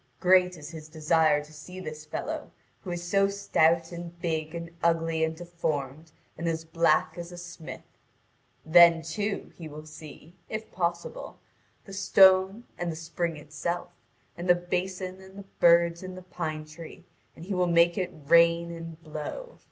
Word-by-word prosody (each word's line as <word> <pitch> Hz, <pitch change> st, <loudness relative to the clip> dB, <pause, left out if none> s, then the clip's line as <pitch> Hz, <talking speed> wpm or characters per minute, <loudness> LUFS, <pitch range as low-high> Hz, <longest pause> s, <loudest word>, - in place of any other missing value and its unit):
Great 180 Hz, -1 st, +4 dB
is 150 Hz, +1 st, -9 dB
his 155 Hz, -1 st, -9 dB
desire 155 Hz, -1 st, +2 dB
to 150 Hz, +1 st, -16 dB
see 180 Hz, +5 st, -10 dB
this 155 Hz, -4 st, -7 dB
fellow, 150 Hz, -, -5 dB, 0.3 s
who 185 Hz, -, -8 dB
is 175 Hz, 0 st, -4 dB
so 195 Hz, +2 st, +3 dB
stout 170 Hz, -4 st, +2 dB
and 170 Hz, 0 st, -8 dB
big 160 Hz, -1 st, -2 dB
and 170 Hz, 0 st, -6 dB
ugly 165 Hz, -1 st, +1 dB
and 160 Hz, 0 st, 0 dB
deformed, 160 Hz, -3 st, -4 dB, 0.3 s
and 170 Hz, -, -2 dB
as 165 Hz, 0 st, -2 dB
black 160 Hz, 0 st, +2 dB
as 170 Hz, +1 st, -7 dB
a 175 Hz, -, -9 dB
smith. 175 Hz, -2 st, -9 dB, 0.8 s
Then, 170 Hz, 0 st, +7 dB
too, 200 Hz, +6 st, -3 dB
he 165 Hz, -, -8 dB
will 155 Hz, 0 st, -10 dB
see, 155 Hz, +1 st, -12 dB, 0.2 s
if 215 Hz, 0 st, -5 dB
possible, 175 Hz, -, -3 dB, 0.5 s
the 195 Hz, -, -11 dB
stone 190 Hz, +2 st, +5 dB, 0.2 s
and 175 Hz, -1 st, -1 dB
the -, -, -6 dB
spring 165 Hz, 0 st, -3 dB
itself, 160 Hz, +4 st, -4 dB, 0.4 s
and 175 Hz, +1 st, -5 dB
the 175 Hz, -, +8 dB
basin 185 Hz, +1 st, -3 dB
and 190 Hz, +1 st, -14 dB
the 200 Hz, -, -9 dB
birds 170 Hz, 0 st, +5 dB
in 185 Hz, -1 st, -7 dB
the 185 Hz, -, -10 dB
pine 155 Hz, -4 st, -4 dB
tree, 155 Hz, +1 st, -11 dB, 0.3 s
and 165 Hz, -, -10 dB
he 195 Hz, -, -3 dB
will 180 Hz, -1 st, +2 dB
make 170 Hz, 0 st, +4 dB
it 185 Hz, -3 st, -1 dB, 0.2 s
rain 170 Hz, +1 st, +5 dB
and 165 Hz, -1 st, -8 dB
blow. 155 Hz, -, -7 dB
170 Hz, 165 wpm, -28 LUFS, 160-180 Hz, 0.8 s, the